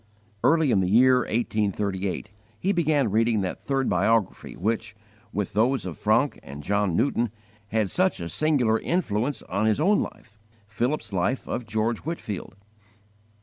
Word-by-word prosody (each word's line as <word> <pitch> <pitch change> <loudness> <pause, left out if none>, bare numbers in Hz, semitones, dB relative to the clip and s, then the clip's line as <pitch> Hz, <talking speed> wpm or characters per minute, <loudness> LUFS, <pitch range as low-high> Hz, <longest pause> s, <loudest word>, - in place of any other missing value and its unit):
Early 160 -3 +4
in 100 - +3
the 90 -1 +1
year 125 +4 +6
1838, 100 -4 -1 0.3
he 195 +2 +1
began 150 - +2
reading 115 0 +2
that 95 -1 -3
third 135 -2 -1
biography 115 -4 +1
which, 110 +2 -2 0.4
with 100 -2 -3
those 115 +3 +2
of 90 -4 -5
Francke - - +1
and 70 +2 -9
John 100 0 +1
Newton, 120 -1 +1 0.4
had 110 -2 0
such 185 +1 +1
a 85 - -4
singular 125 - +2
influence 140 - -1
on 100 +4 -1
his 110 +4 +2
own 200 +7 +4
life 105 +1 -7 0.3
Philip's 120 +2 -2
Life 95 +8 -1
of 120 -2 -4
George 110 +1 0
Whitefield. 110 - -5
110 Hz, 150 wpm, -25 LUFS, 100-135 Hz, 0.4 s, year